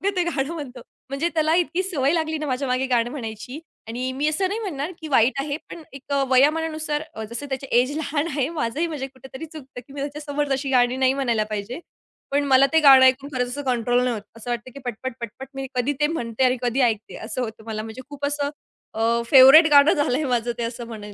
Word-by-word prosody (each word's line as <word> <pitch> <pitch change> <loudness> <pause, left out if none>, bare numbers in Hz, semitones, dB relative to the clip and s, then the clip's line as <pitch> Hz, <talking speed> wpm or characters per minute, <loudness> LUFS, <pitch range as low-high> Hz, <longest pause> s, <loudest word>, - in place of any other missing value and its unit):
ते 360 - +2
गाणं 310 -2 -2
म्हणतो. 265 -6 -7 0.3
म्हणजे 290 +5 -1
त्याला 315 0 +2
इतकी 355 +4 -3
सवय 295 -6 0
लागली 315 -1 -1
ना, 305 - -4
माझ्यामागे 255 0 -1
गाणं 235 +1 +1
म्हणायची 245 +2 -7 0.3
आणि 250 +3 -3
मी 300 - +1
असं 370 +5 +1
नाही 420 +4 -3
म्हणणार, 330 -6 -4
की 315 - -6
वाईट 245 +4 +3
आहे, 285 +1 -3
पण 330 - -9
एक 275 +1 -11
अ, 275 -1 +2
वयामानानुसार 305 +2 +2
अ, 220 - -6
जसं 240 +5 -5
त्याची 265 0 -4
एज 275 +4 -3
लहान 300 +1 -1
आहे, 285 -2 -1
माझंही 295 +9 -1
म्हणजे 285 -4 -5
कुठेतरी 265 +3 -10
चुकतं 270 -5 -11
की 275 - -14
मी 280 - -5
त्याच्यासमोर 290 0 -3
तशी 270 0 -1
गाणी 245 +1 +2
नाही 260 - +4
म्हणायला 230 -4 +1
पाहिजे. 215 +8 -4 0.5
पण 285 +1 +2
मला 270 0 +5
ते 320 - +6
गाणं 265 -2 +9
ऐकून 270 +2 +2
खरंच 250 -1 0
असं 285 +3 -4
कंट्रोल 245 -1 +1
नाही 250 - +1
होतं. 210 -2 -7
असं 235 +2 -8
वाटतं 240 +2 -4
की 280 - -11
पटपट-पटपट 245 +1 -6
मी 270 0 -4
कधी 250 +4 0
ते 295 - +3
म्हणते 235 -3 -2
आणि 255 0 +2
कधी 245 +2 0
ऐकते 220 -3 0
असं 255 +2 -4
होतं 220 -2 -6
मला, 215 -1 -4
म्हणजे 225 +3 -8
खूप 285 0 -5
असं 285 0 -1 0.4
अ, 230 +1 +1
फेव्हरेट 275 +4 +9
गाणं 285 +1 +7
झालंय 290 0 0
माझं 240 0 0
ते 235 - -2
असं 230 0 -5
म्हणेन. 210 -3 -9
270 Hz, 220 wpm, -23 LUFS, 245-295 Hz, 0.5 s, गाणं